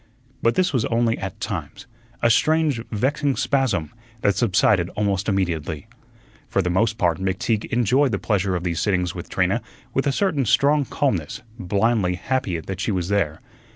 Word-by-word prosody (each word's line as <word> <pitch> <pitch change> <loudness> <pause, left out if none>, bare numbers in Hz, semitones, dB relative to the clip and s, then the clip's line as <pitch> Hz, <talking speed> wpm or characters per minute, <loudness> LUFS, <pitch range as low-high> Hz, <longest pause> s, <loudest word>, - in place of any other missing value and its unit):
But 115 - +2
this 185 -4 +2
was 125 -4 +2
only 115 0 +1
at 95 -1 -6
times - - -5 0.4
a 115 - +5
strange, 155 -2 +2
vexing 135 +5 0
spasm, 110 - 0 0.3
that 100 - +2
subsided 95 -5 +3
almost 100 -1 0
immediately. 85 -6 -1 0.6
For 95 - +1
the 90 - 0
most 110 +4 +1
part, 85 -6 +1
McTeague 95 +3 -1
enjoyed 125 +4 +2
the 100 - 0
pleasure 100 -2 0
of 90 - -2
these 85 -2 -1
sittings 90 -3 0
with - - -8
Trina - - +1 0.3
with 135 +2 0
a - - +3
certain 150 -4 +1
strong 145 +6 +3
calmness, 95 - -2 0.2
blindly 100 -1 +1
happy 100 -4 -1
that 95 +3 -6
she 110 - -1
was 90 -2 -2
there. 90 -7 0
105 Hz, 165 wpm, -23 LUFS, 90-130 Hz, 0.6 s, a